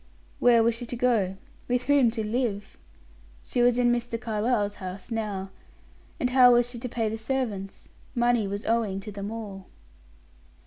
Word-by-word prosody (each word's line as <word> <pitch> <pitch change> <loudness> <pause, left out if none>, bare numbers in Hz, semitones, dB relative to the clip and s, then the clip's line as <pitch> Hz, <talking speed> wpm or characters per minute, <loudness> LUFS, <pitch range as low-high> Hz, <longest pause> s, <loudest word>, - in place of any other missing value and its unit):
Where 235 -2 +5
was 230 +1 +3
she 235 +1 -7
to 245 - -5
go? 225 -6 +1 0.3
With 250 0 +1
whom 280 -3 +4
to 225 -1 -3
live? 215 -3 -2 0.7
She 245 - -1
was 240 0 +4
in 245 -1 +3
Mr. 240 -1 -1
Carlyle's 215 -2 -1
house 185 +4 -7
now. 205 -4 -3 0.7
And 250 - 0
how 250 -1 +7
was 240 0 +4
she 245 -1 -7
to 250 - -5
pay 225 -1 -1
the 220 +1 -3
servants? 220 -5 -3 0.3
Money 240 -3 +2
was 200 +2 -5
owing 220 -4 0
to 210 - -8
them 200 0 -5
all. 205 -4 -7
230 Hz, 170 wpm, -26 LUFS, 205-245 Hz, 0.7 s, how